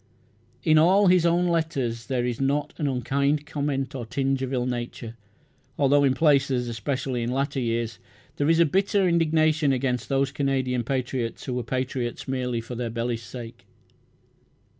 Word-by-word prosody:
In 155 -1 +5
all 190 +6 +5
his 180 -2 +5
own 175 +1 +2
letters 135 -9 -1
there 125 -3 0
is 120 +1 -3
not 140 +2 0
an 150 - 0
unkind 140 +3 0
comment 140 -2 -2
or 130 -3 -4
tinge 135 +3 -1
of 130 -1 -3
ill 125 -2 0
nature, 120 -2 -5 0.6
although 145 0 +4
in 135 -2 +3
places, 135 -4 +2
especially 125 +2 -2
in 115 - -2
later 135 +1 -1
years, 115 -3 -2 0.4
there 145 +1 +1
is 165 +1 +5
bitter 195 +4 +2
indignation 155 -3 +2
against 125 -2 -1
those 135 -1 +1
Canadian 130 -3 0
patriots 125 -2 -3
who 130 - -3
were 125 - -1
patriots 125 +1 -3
merely 125 -3 -2
for 115 +2 -8
their 120 -1 -3
bellies' 115 0 -2
sake. 115 +1 -10
135 Hz, 160 wpm, -25 LUFS, 125-145 Hz, 0.6 s, In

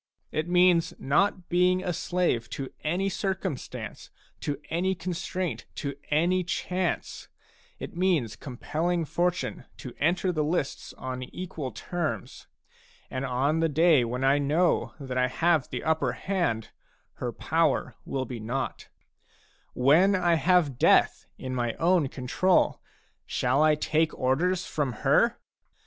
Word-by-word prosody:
It 155 +3 -2
means 175 -1 +4
not 180 +6 +1
being 180 +1 +2
a 180 - -1
slave 170 - 0
to 135 -2 -5
any 175 +5 0
circum 190 -5 -2
stance, - - -8 0.3
to 145 -2 -3
any 185 +3 +1
constraint, 175 -5 -4
to 140 -1 -4
any 175 +5 +2
chance; 180 0 -2 0.5
it - - -8
means 170 - +1
compelling 160 +9 -2
Fortune 175 +3 -1
to 125 - -8
enter 175 +4 +2
the 155 -3 0
lists 150 -2 -2
on 130 0 -5
equal 150 0 -6
terms. 155 - -4 0.6
And 130 +1 -2
on 140 +5 +1
the 165 0 +2
day 155 -2 +4
when 125 +3 -3
I 135 +2 +4
know 155 +5 +1
that 130 -2 -3
I 125 - +3
have 160 +2 +1
the - - -4
upper 155 -6 +1
hand, 170 - -1 0.5
her - - -3
power - - 0
will 130 -1 -3
be 125 -3 -6
naught. 125 +5 -4 0.9
When 160 +10 +5
I 175 -2 +2
have 165 -6 +2
death - - +4
in 130 0 -5
my 120 -2 -1
own 170 -3 +3
control, 135 +9 +1 0.5
shall 145 - +1
I 155 0 +5
take 155 +1 0
orders 170 +8 +1
from 145 -5 -2
her? - - +4
160 Hz, 135 wpm, -27 LUFS, 130-180 Hz, 0.9 s, When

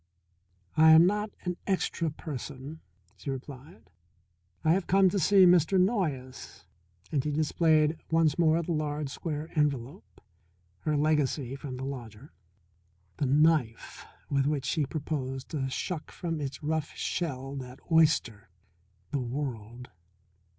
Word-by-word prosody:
"I 160 0 +7
am 160 +2 +8
not 210 +3 0
an 180 -1 -3
extra 180 -4 0
person," 145 0 -7 0.4
she - - -7
replied. 135 +5 -8 0.7
"I 160 - +4
have 180 +1 +1
come 195 0 +5
to 195 - -1
see 195 +2 +6
Mr. 180 +1 +4
Noyes," 160 - -2 0.5
and 140 -4 +1
she 150 - -2
displayed 155 +1 +2
once 165 -1 +2
more 165 0 +3
the 170 - -4
large 150 -2 -2
square 155 +2 -5
envelope, 145 - -2 0.6
her 150 +6 -1
legacy 145 -3 +1
from 135 -2 -7
the 130 - -5
lodger, 125 -1 -8 0.8
the 140 - 0
knife 145 -4 +1 0.2
with 140 -1 +1
which 145 -3 -1
she 150 -1 0
proposed 135 -2 -4
to 135 -4 -2
shuck 160 +4 -4
from 165 -3 -4
its 140 +1 -5
rough 155 0 -2
shell 135 -5 -3
that 130 0 -8
oyster, 150 - +2 0.6
the 140 - -1
world. 125 -2 -5
150 Hz, 130 wpm, -29 LUFS, 135-165 Hz, 0.8 s, am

